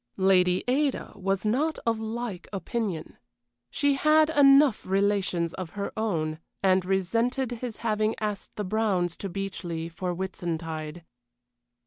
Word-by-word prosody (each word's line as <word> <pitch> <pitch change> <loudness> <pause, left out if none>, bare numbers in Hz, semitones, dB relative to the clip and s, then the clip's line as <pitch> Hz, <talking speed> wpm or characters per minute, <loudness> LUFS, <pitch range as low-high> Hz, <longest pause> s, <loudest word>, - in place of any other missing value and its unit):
Lady 185 -1 +3
Ada 275 +2 0
was 195 0 -1
not 285 +9 +1
of 225 -1 +1
like 220 -3 -4
opinion; 195 -2 -3 0.5
she 285 - +2
had 305 +2 +4
enough 275 -4 +6
relations 190 -3 +1
of 180 -3 -6
her 200 - -2
own, 160 -8 -1 0.2
and 190 -1 +4
resented 230 +7 0
his 240 -1 -5
having 215 0 +1
asked 210 -2 -4
the 210 - -3
Browns 185 -4 0
to 195 - -5
Beechleigh 175 -3 -4
for 180 +2 -3
Whitsuntide. 165 -3 -4
195 Hz, 125 wpm, -27 LUFS, 180-230 Hz, 0.5 s, enough